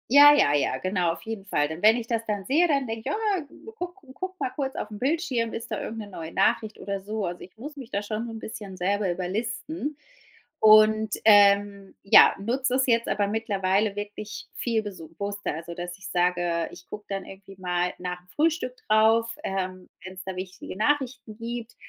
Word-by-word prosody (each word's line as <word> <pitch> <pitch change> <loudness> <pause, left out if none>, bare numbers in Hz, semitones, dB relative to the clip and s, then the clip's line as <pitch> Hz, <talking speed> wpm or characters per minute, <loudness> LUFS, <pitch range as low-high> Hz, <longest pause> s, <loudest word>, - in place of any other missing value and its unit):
Ja, 290 +3 +9
ja, 145 - +4
ja, 145 -2 +1
genau, 180 -3 0
auf 165 - -11
jeden 220 -2 -6
Fall. 145 -7 +1
Denn 160 +2 -6
wenn 220 +2 +7
ich 235 -2 -4
das 230 -1 -1
dann 205 -3 -3
sehe, 320 +6 +3
dann 280 -4 +1
denk 225 0 -5
ich: - - -1
„Ah, 415 -7 0 0.3
guck 360 -4 -5 0.2
guck 375 +4 -6
mal - - -1
kurz 270 -2 -3
aufm 210 0 -5
Bildschirm, 265 -5 0
ist 230 +1 -6
da 215 - -2
irgend 225 - -5
'ne 210 - -6
neue 165 -4 -8
Nachricht 220 -1 +1
oder 200 -1 -3
so? 210 +1 -3
Also, 175 0 -5
ich 185 - -13
muss 295 +6 -8
mich 260 -3 -9
da 200 - -1
schon 215 +2 -3
so 235 - -6
'n 225 - -6
bisschen 205 -3 -8
selber 195 +2 0
überlisten 235 - -3 0.6
und, 215 0 +6
ähm, 200 -1 +5
ja, 195 - +8
nutz 250 +6 -1
es 260 +1 +2
jetzt 230 -1 +2
aber 205 0 +1
mittlerweile 200 -1 0
wirklich 205 +1 -6
viel 230 -2 0
besu 185 -7 -8
wusster, 205 -2 -3
also 165 +2 -7
dass 175 +1 -6
ich 195 - -10
sage, 175 -2 +1
ich - - -13
guck 210 - -9
dann 195 -1 -4
irgendwie 195 0 -12
mal 180 0 -1
nachm 180 0 -6
Frühstück 310 -5 0
drauf, 225 +2 +4
ähm, 185 -1 -4 0.2
wenn's 185 0 -8
da 190 -1 -4
wichtige 185 0 -7
Nachrichten 245 -3 -1
gibt. 235 0 -6
210 Hz, 195 wpm, -26 LUFS, 190-235 Hz, 0.6 s, Ja